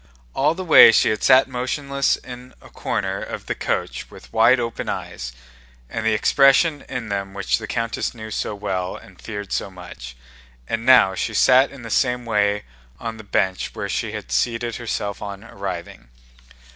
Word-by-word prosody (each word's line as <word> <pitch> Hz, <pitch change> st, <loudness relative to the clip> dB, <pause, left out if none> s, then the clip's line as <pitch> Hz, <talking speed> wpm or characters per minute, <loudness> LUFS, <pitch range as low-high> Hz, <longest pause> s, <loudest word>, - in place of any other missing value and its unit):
All 145 Hz, +4 st, +2 dB
the 185 Hz, +1 st, -5 dB
way 160 Hz, -, +9 dB
she -, -, +3 dB
had 110 Hz, -, -2 dB
sat 130 Hz, 0 st, +6 dB
motionless 140 Hz, +2 st, -1 dB
in 125 Hz, 0 st, -11 dB
a -, -, -17 dB
corner -, -, -3 dB
of -, -, -6 dB
the -, -, -2 dB
coach -, -, -3 dB
with -, -, -15 dB
wide 120 Hz, +3 st, +5 dB
open 115 Hz, -1 st, -4 dB
eyes, 60 Hz, 0 st, -5 dB, 0.6 s
and 115 Hz, -, -3 dB
the 110 Hz, -1 st, +2 dB
expression 135 Hz, +6 st, +4 dB
in 125 Hz, -4 st, -5 dB
them 100 Hz, -1 st, -4 dB
which 100 Hz, +3 st, 0 dB
the 110 Hz, -, -7 dB
countess 115 Hz, +1 st, -2 dB
knew 110 Hz, -1 st, -8 dB
so 105 Hz, -, -3 dB
well 95 Hz, -3 st, -3 dB
and -, -, -14 dB
feared 100 Hz, -2 st, -7 dB
so -, -, -2 dB
much, 85 Hz, -10 st, -10 dB, 0.5 s
and 115 Hz, 0 st, -3 dB
now 125 Hz, -7 st, +7 dB
she 105 Hz, +4 st, -3 dB
sat 130 Hz, +5 st, +5 dB
in 140 Hz, -3 st, -12 dB
the 115 Hz, -, -7 dB
same 125 Hz, 0 st, +1 dB
way 105 Hz, -2 st, +1 dB, 0.4 s
on 115 Hz, -1 st, -5 dB
the 110 Hz, -, -10 dB
bench 95 Hz, -2 st, -1 dB
where -, -, -3 dB
she -, -, -2 dB
had -, -, -7 dB
seated 115 Hz, -, 0 dB
herself 105 Hz, -4 st, -4 dB
on 100 Hz, 0 st, -7 dB
arriving. 95 Hz, -, -7 dB
110 Hz, 180 wpm, -22 LUFS, 100-125 Hz, 0.6 s, way